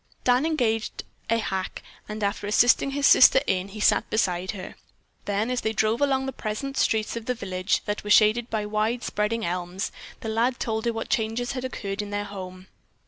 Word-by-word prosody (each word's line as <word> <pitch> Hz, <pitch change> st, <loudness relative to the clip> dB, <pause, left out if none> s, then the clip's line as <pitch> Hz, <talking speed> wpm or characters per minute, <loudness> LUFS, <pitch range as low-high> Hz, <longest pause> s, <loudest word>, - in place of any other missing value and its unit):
Dan 250 Hz, +5 st, +3 dB
engaged 230 Hz, -8 st, -1 dB, 0.3 s
a 230 Hz, -, +3 dB
hack 190 Hz, -4 st, -3 dB, 0.3 s
and 210 Hz, 0 st, -4 dB
after 200 Hz, 0 st, -1 dB
assisting 240 Hz, +5 st, +4 dB
his 280 Hz, +1 st, -1 dB
sister 265 Hz, -, +8 dB
in, 185 Hz, 0 st, 0 dB
he 205 Hz, +2 st, -9 dB
sat -, -, +3 dB
beside 185 Hz, -4 st, 0 dB
her. 190 Hz, -3 st, -5 dB, 0.5 s
Then, 205 Hz, +4 st, -1 dB
as 250 Hz, -, -1 dB
they 220 Hz, -, -1 dB
drove 220 Hz, +3 st, +1 dB
along 270 Hz, -2 st, +2 dB
the 265 Hz, -, -4 dB
pleasant 265 Hz, +6 st, -4 dB
streets 220 Hz, -3 st, +1 dB
of 230 Hz, -1 st, -6 dB
the 250 Hz, -, 0 dB
village 185 Hz, -3 st, -1 dB
that 205 Hz, 0 st, -3 dB
were 210 Hz, -, -6 dB
shaded 220 Hz, +3 st, +5 dB
by 215 Hz, -2 st, -2 dB
wide 215 Hz, +3 st, -1 dB
spreading 215 Hz, +2 st, -1 dB
elms, 180 Hz, +3 st, -3 dB, 0.3 s
the -, -, -5 dB
lad 235 Hz, +3 st, +1 dB
told 220 Hz, 0 st, -2 dB
her 235 Hz, -, +2 dB
what 225 Hz, -, -5 dB
changes 225 Hz, +2 st, -1 dB
had 255 Hz, -2 st, -4 dB
occurred 200 Hz, -6 st, -4 dB
in 205 Hz, -, -6 dB
their 205 Hz, 0 st, -2 dB
home. 185 Hz, -2 st, -8 dB
220 Hz, 195 wpm, -25 LUFS, 205-240 Hz, 0.5 s, sister